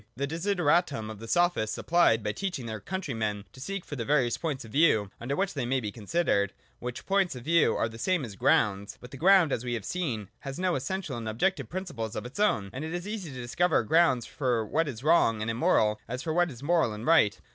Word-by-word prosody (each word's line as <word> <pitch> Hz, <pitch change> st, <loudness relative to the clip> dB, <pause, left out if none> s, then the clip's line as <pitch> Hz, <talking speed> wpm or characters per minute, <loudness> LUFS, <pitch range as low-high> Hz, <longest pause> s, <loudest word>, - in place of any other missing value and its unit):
That 140 Hz, +3 st, -2 dB
desideratum 165 Hz, -, +1 dB
the 115 Hz, -, -8 dB
Sophists 175 Hz, -7 st, +1 dB
supplied 160 Hz, -11 st, +3 dB
by 105 Hz, -, 0 dB
teaching 175 Hz, -, -4 dB
their 110 Hz, -1 st, -5 dB
countrymen 110 Hz, -, -3 dB
to -, -, -13 dB
seek 195 Hz, +5 st, -4 dB
for 145 Hz, -, -6 dB
the 120 Hz, -, -3 dB
various 125 Hz, -2 st, +2 dB
points 145 Hz, -7 st, -4 dB
of 110 Hz, -, -12 dB
view 110 Hz, -10 st, +3 dB
under 130 Hz, +4 st, -2 dB
which 195 Hz, +3 st, 0 dB
things 130 Hz, -5 st, -3 dB
may 135 Hz, 0 st, +2 dB
be 105 Hz, -4 st, -4 dB
considered: 100 Hz, -, 0 dB, 0.3 s
which 125 Hz, 0 st, -6 dB
points 195 Hz, -5 st, +1 dB
of 125 Hz, -, -8 dB
view 165 Hz, +3 st, +3 dB
are -, -, +1 dB
the 115 Hz, 0 st, -10 dB
same 180 Hz, -1 st, 0 dB
as 105 Hz, -4 st, -9 dB
grounds. 100 Hz, +1 st, +1 dB
But 125 Hz, -, -12 dB
the 135 Hz, -, -8 dB
ground, 180 Hz, 0 st, +5 dB
as 120 Hz, -, -1 dB
we 120 Hz, -1 st, -2 dB
have 110 Hz, -, -5 dB
seen, 125 Hz, -, -3 dB
has 135 Hz, -1 st, -6 dB
no 180 Hz, 0 st, 0 dB
essential 150 Hz, +1 st, -3 dB
and 115 Hz, -1 st, -4 dB
objective 135 Hz, -, 0 dB
principles 150 Hz, -, -5 dB
of -, -, -4 dB
its 125 Hz, +10 st, -8 dB
own, 105 Hz, -, +1 dB
and 135 Hz, -, -5 dB
it 160 Hz, +2 st, -4 dB
is 175 Hz, -, -3 dB
as -, -, -7 dB
easy 205 Hz, -6 st, -5 dB
to 130 Hz, -2 st, -7 dB
discover 160 Hz, +4 st, +1 dB
grounds 145 Hz, -2 st, +3 dB
for 125 Hz, -5 st, -1 dB
what 155 Hz, +9 st, 0 dB
is 125 Hz, -3 st, -6 dB
wrong 150 Hz, -9 st, +4 dB
and 110 Hz, +1 st, -1 dB
immoral 110 Hz, -2 st, +2 dB
as 125 Hz, +3 st, -4 dB
for 160 Hz, -, -2 dB
what 175 Hz, +1 st, +2 dB
is 130 Hz, -2 st, -10 dB
moral 160 Hz, -7 st, +2 dB
and 105 Hz, +2 st, -7 dB
right. 155 Hz, -12 st, +4 dB
135 Hz, 235 wpm, -28 LUFS, 115-170 Hz, 0.3 s, ground